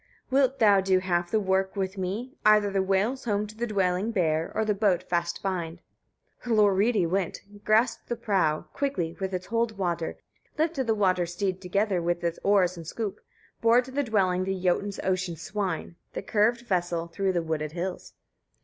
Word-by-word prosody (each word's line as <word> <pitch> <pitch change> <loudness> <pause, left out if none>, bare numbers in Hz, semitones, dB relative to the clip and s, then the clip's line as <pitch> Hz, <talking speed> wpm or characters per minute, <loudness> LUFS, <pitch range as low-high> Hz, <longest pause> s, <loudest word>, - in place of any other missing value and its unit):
26. - - -33
"Wilt 270 0 +3
thou 205 -4 +6
do 190 0 +3
half 175 -2 0
the 220 - +2
work 190 -1 0
with 190 0 -2
me, 205 +8 -4
either 210 -1 +5
the 195 0 +1
whales 200 +8 0
home 210 -2 0
to 210 +1 -11
the 240 +2 -2
dwelling 195 -1 0
bear, 165 -7 0
or 220 - +1
the 215 - +2
boat 200 -3 +1
fast 170 0 -1
bind?" 175 -3 -3 0.6
27. 235 -3 0
Hlorridi 205 -1 +3
went, 185 0 -1 0.2
grasped 225 +3 +2
the 240 - 0
prow, 185 -9 +1
quickly, 180 -13 -2
with 190 -1 -2
its 185 -1 -3
hold 230 -1 -1
water, 170 -3 -2 0.4
lifted 305 -5 0
the 225 - +2
water 185 -4 +2
steed, 185 +1 -2
together 195 0 0
with 175 0 -1
its 170 -1 -1
oars 185 -3 +3
and 165 -2 -9
scoop; 215 +2 -4 0.4
bore 230 +2 +5
to 260 - -11
the 285 +2 0
dwelling 190 -7 +1
the 190 0 -2
Jotun's 190 +2 0
ocean 185 -2 -1
swine, 180 -2 -4 0.2
the - - -4
curved 230 +3 +2
vessel, 175 -6 -1
through 190 +3 -1
the 175 -2 0
wooded 155 -2 -3
hills. 180 +2 -5
195 Hz, 185 wpm, -27 LUFS, 180-215 Hz, 0.6 s, thou